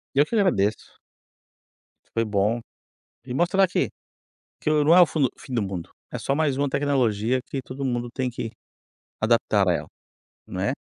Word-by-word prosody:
Eu 145 +2 +6
que - - -5
agradeço. 110 - +1 1.2
Foi 115 0 +2
bom 105 +2 +1 0.7
e 125 - -5
mostrar 180 +6 +3
que 180 - 0 0.7
que - - 0
o 150 -1 +3
não 165 +3 +7
é 180 - +9
o - - +8
fundo 150 -4 +1
o - - -24
fim 130 - -9
do 115 - +1
mundo, 95 -4 -4 0.2
é - - -3
só 135 - -1
mais 150 -3 +1
uma 140 0 +1
tecnologia 130 -4 +1
que 135 - -3
todo 130 +3 -7
mundo 120 -2 -1
tem 130 -1 -1
que 115 -2 -5 0.7
adaptar 110 -3 +3
a 90 - +4
ela, - - -3 0.6
né. - - -1
130 Hz, 175 wpm, -25 LUFS, 110-145 Hz, 1.2 s, é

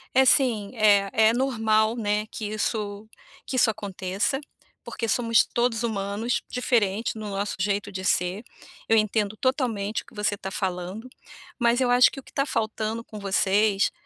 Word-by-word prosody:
É 265 0 +6
sim, 240 -7 +3
é 205 -2 +4
é 220 +1 +4
normal, 225 -3 +1
né, 210 -2 -1
que 215 - -5
isso 210 0 -3 0.4
que 260 - -4
isso 245 - +4
aconteça, 205 +4 -2 0.4
porque 230 - -4
somos 230 0 +3
todos 240 -1 -1
humanos, 210 +1 -2
diferente 225 -4 0
no 215 -1 -6
nosso 200 +1 -3
jeito 205 +1 -1
de 190 0 -6
ser, 185 +4 0 0.4
eu 225 - +4
entendo 215 0 0
totalmente 230 -6 -1
o - - -23
que - - -18
você 210 0 0
está 195 -1 -6
falando, 190 +4 -4 0.5
mas 235 +1 +3
eu 250 -1 +2
acho 250 0 +6
que 270 - -8
o - - -12
que - - -17
está 275 - 0
faltando 220 -2 -2
com 215 -2 -10
vocês 200 +1 +2
215 Hz, 165 wpm, -25 LUFS, 200-235 Hz, 0.5 s, É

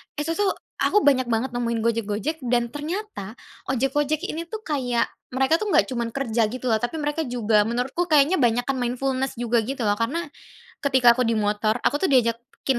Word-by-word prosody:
itu 300 +2 -2
tuh 400 -2 +2 0.2
aku 420 - +3
banyak 260 -3 +3
banget 240 +2 0
nemuin 235 -1 -1
Gojek-Gojek 230 +6 -1
dan 240 -1 +1
ternyata 300 - -5 0.3
ojek-ojek 275 +4 0
ini 330 +2 -4
tuh 435 +4 -7
kayak 250 - -1 0.2
mereka 270 +5 +3
tuh 430 - -3
enggak 405 - +4
cuman 235 -2 -1
kerja 235 -5 +1
gitu 255 +1 -5
loh 220 - +3
tapi 240 +8 -3
mereka 300 +1 -1
juga 225 -3 +2
menurutku 250 +9 -1
kayaknya 305 +1 +4
banyakan 245 +1 +1
mindfulness 255 +2 -1
juga 240 0 +1
gitu 265 -2 -3
loh 205 0 +1
karena, 290 +7 -2 0.5
ketika 260 -4 +5
aku 255 - +1
di 230 -1 +1
motor 210 +1 +1
aku 290 - +1
tuh 380 - +3
diajakin 240 +1 +1
255 Hz, 180 wpm, -24 LUFS, 235-295 Hz, 0.5 s, ketika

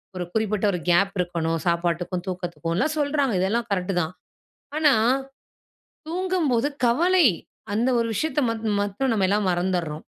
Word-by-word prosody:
ஒரு 180 -1 -3
குறிப்பிட்ட 215 -2 0
ஒரு 180 - -2
கேப் 195 +3 +3
இருக்கணும் 170 -2 -1
சாப்பாட்டுக்கும், 170 +1 -1
தூக்கத்துக்கும்லாம் 175 - -2
சொல்றாங்க 285 -4 +1
இதெல்லாம் 230 +6 0
கரெட்‌டு 185 -1 -1
தான். 160 +1 -4 0.6
ஆனா 300 -3 +5 1.2
தூங்கும்போது 330 -8 0 0.2
"கவலை" 345 +7 +4 0.5
அந்த 230 +5 +1
ஒரு 230 - +1
விஷயத்த 310 +7 0
மத் 225 0 -4 0.2
மட்டும் 205 +7 -1
நம்ம 195 -4 +2
எல்லாம் 200 -1 +1
மறந்துறோம். 175 -3 -1
200 Hz, 130 wpm, -24 LUFS, 175-270 Hz, 1.2 s, ஆனா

